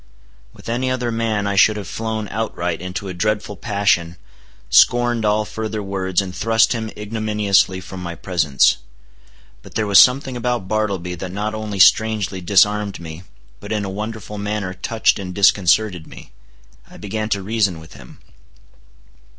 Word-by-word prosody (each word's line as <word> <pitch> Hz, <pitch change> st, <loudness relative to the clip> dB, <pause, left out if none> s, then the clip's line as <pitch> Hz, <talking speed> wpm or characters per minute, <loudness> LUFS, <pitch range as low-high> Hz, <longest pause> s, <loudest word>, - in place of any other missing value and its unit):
With -, -, -15 dB
any 125 Hz, +3 st, -1 dB
other 125 Hz, -2 st, -1 dB
man 115 Hz, -3 st, -1 dB
I 100 Hz, 0 st, -1 dB
should 105 Hz, +2 st, +4 dB
have 100 Hz, -4 st, -6 dB
flown 110 Hz, -1 st, -4 dB
outright 90 Hz, -6 st, -3 dB
into 90 Hz, +2 st, -5 dB
a 95 Hz, -, -5 dB
dreadful 105 Hz, +3 st, -2 dB
passion, 100 Hz, -6 st, 0 dB, 0.5 s
scorned 120 Hz, -2 st, +4 dB
all 105 Hz, +1 st, +1 dB
further 110 Hz, 0 st, -4 dB
words, 95 Hz, -1 st, -1 dB
and 90 Hz, -1 st, -8 dB
thrust 115 Hz, +1 st, +2 dB
him 110 Hz, -2 st, -4 dB
ignominiously 105 Hz, -3 st, 0 dB
from 95 Hz, 0 st, -9 dB
my 85 Hz, -1 st, -5 dB
presence. 80 Hz, -6 st, +2 dB, 0.8 s
But -, -, -15 dB
there 110 Hz, -, 0 dB
was 100 Hz, -2 st, +6 dB
something 130 Hz, 0 st, +4 dB
about 120 Hz, -5 st, -2 dB
Bartleby 100 Hz, -4 st, -2 dB
that 90 Hz, 0 st, -5 dB
not 105 Hz, +3 st, -3 dB
only 110 Hz, -2 st, -5 dB
strangely 100 Hz, -1 st, +3 dB
disarmed 100 Hz, +2 st, +2 dB
me, 80 Hz, 0 st, -9 dB, 0.4 s
but -, -, -9 dB
in 105 Hz, -2 st, -1 dB
a 95 Hz, -, -5 dB
wonderful 105 Hz, 0 st, -6 dB
manner 100 Hz, -2 st, -3 dB
touched 110 Hz, +3 st, 0 dB
and 90 Hz, -2 st, -6 dB
disconcerted 100 Hz, -2 st, +3 dB
me. -, -, -13 dB, 0.6 s
I -, -, -14 dB
began 110 Hz, +1 st, -4 dB
to 100 Hz, -2 st, -1 dB
reason 100 Hz, -5 st, 0 dB
with 80 Hz, 0 st, -14 dB
him. 65 Hz, -2 st, -15 dB
105 Hz, 160 wpm, -20 LUFS, 95-110 Hz, 0.8 s, was